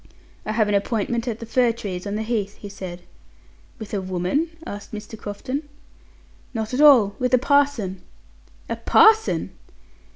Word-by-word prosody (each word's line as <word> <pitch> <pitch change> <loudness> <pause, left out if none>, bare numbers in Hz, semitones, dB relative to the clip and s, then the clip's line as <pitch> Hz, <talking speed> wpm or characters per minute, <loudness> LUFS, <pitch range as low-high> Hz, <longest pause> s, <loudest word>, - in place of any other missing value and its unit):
"I 215 - -1
have 215 -1 +2
an 205 - 0
appointment 225 +3 -1
at 225 -3 -2
the 230 - -7
fir 240 +1 +2
trees 200 -4 -6
on 200 - -3
the 215 - -2
Heath," 215 -3 -2
he 205 - -9
said. 180 -3 -8 0.7
"With 220 -2 -9
a 200 - 0
woman?" 185 - -1 0.2
asked 205 +1 -8
Mr. 210 +1 -7
Crofton. 220 +7 -5 0.9
"Not 220 +1 -3
at 260 - +1
all; 240 -10 +7
with 250 0 +3
a - - +5
parson." 255 -9 +1 0.7
"A - - -3
parson!" 440 0 +4
220 Hz, 160 wpm, -23 LUFS, 200-250 Hz, 0.9 s, all